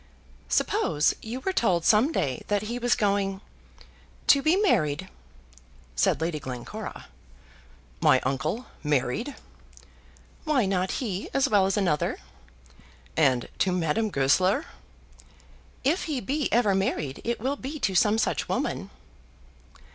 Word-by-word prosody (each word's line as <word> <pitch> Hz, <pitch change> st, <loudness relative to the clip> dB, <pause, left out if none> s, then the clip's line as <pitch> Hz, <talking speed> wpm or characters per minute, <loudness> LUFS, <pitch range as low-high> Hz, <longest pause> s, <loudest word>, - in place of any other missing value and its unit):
"Suppose 160 Hz, -, +2 dB
you 240 Hz, +4 st, -6 dB
were 380 Hz, -, -1 dB
told 180 Hz, -, +1 dB
some 225 Hz, +8 st, +5 dB
day 130 Hz, -, -1 dB
that 205 Hz, 0 st, 0 dB
he 235 Hz, +3 st, -4 dB
was 245 Hz, -1 st, +2 dB
going 200 Hz, -2 st, 0 dB, 0.9 s
to 280 Hz, -, +6 dB
be 315 Hz, +5 st, +3 dB
married?" 155 Hz, -, +1 dB, 0.9 s
said -, -, +2 dB
Lady 160 Hz, -1 st, -1 dB
Glencora. 125 Hz, -3 st, -7 dB, 0.9 s
"My 130 Hz, -, +5 dB
uncle 155 Hz, -, -2 dB, 0.2 s
married!" 150 Hz, -, -1 dB, 1.1 s
"Why 295 Hz, -8 st, +2 dB
not 190 Hz, -1 st, 0 dB
he 195 Hz, -2 st, -4 dB
as 275 Hz, +1 st, +3 dB
well 200 Hz, -6 st, +3 dB
as 195 Hz, -, 0 dB
another?" 175 Hz, -7 st, +1 dB, 1.0 s
"And 130 Hz, -6 st, +2 dB
to 190 Hz, -, +2 dB
Madame 180 Hz, +5 st, 0 dB
Goesler?" 185 Hz, -, +2 dB, 1.2 s
"If 310 Hz, +8 st, +1 dB
he 300 Hz, -6 st, -2 dB
be 275 Hz, +7 st, -2 dB
ever 220 Hz, -4 st, +3 dB
married 160 Hz, -8 st, -1 dB
it 235 Hz, +1 st, -2 dB
will 265 Hz, +5 st, -1 dB
be 285 Hz, +2 st, -6 dB
to 195 Hz, -, +1 dB
some 210 Hz, +4 st, +4 dB
such -, -, -1 dB
woman." -, -, -2 dB
200 Hz, 125 wpm, -26 LUFS, 155-255 Hz, 1.2 s, to